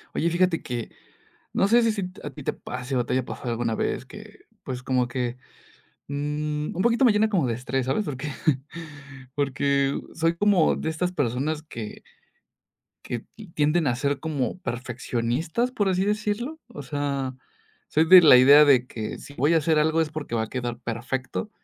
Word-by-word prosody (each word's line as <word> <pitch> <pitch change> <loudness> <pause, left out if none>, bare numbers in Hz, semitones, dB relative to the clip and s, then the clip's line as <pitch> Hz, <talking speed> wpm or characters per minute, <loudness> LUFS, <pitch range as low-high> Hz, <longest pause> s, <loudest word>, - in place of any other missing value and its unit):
Oye, 170 - +1
fíjate 175 0 +1
que, 120 -2 -5 0.6
no - - +2
sé 235 +3 +5
si 230 - +3
si 215 -2 -2 0.2
a 145 - -5
ti 135 - -11
te - - 0
pase, 125 +2 -5
o 125 - +1
te - - -4
haya 130 0 +1
pasado 120 0 -6
alguna 115 -1 -1
vez - - -2
que, - - -13 0.2
pues, 125 -1 -5
como 125 -2 +1
que, 125 0 -3 0.7
mm, 150 +2 -3
un 180 - -1
poquito 235 +4 +3
me 230 - +5
llena 215 +1 +3
como 180 - +1
de 120 - 0
estrés, 125 +2 -2
¿sabes?, 135 +11 0
porque 145 -3 -5 1.1
porque 140 0 +1 0.2
soy 165 +1 +1
como 195 -3 +3
de - - -3
estas 180 +3 -1
personas 145 +2 -1
que 115 -8 -8 1.0
que 120 -2 -5 0.3
tienden 150 +2 +2
a 120 - +1
ser 140 +2 -1
como 150 0 -2
perfeccionistas, 125 - -2
por 205 -6 0
así 185 +1 +1
decirlo, 215 +8 -2
o 145 - -9
sea, 140 -1 -2 0.5
soy 160 - +2
de 185 +2 +10
la 145 -6 +8
idea 140 +4 +8
de 130 -4 +5
que, 110 -4 -5
si 140 - -12
voy 145 +4 +2
a - - +6
hacer 155 0 +2
algo 160 +1 +2
es 160 -1 -2
porque 150 -6 -5
va 110 - +1
a 110 - -7
quedar 120 -2 -3
perfecto, 125 - -4
145 Hz, 185 wpm, -25 LUFS, 125-170 Hz, 1.1 s, de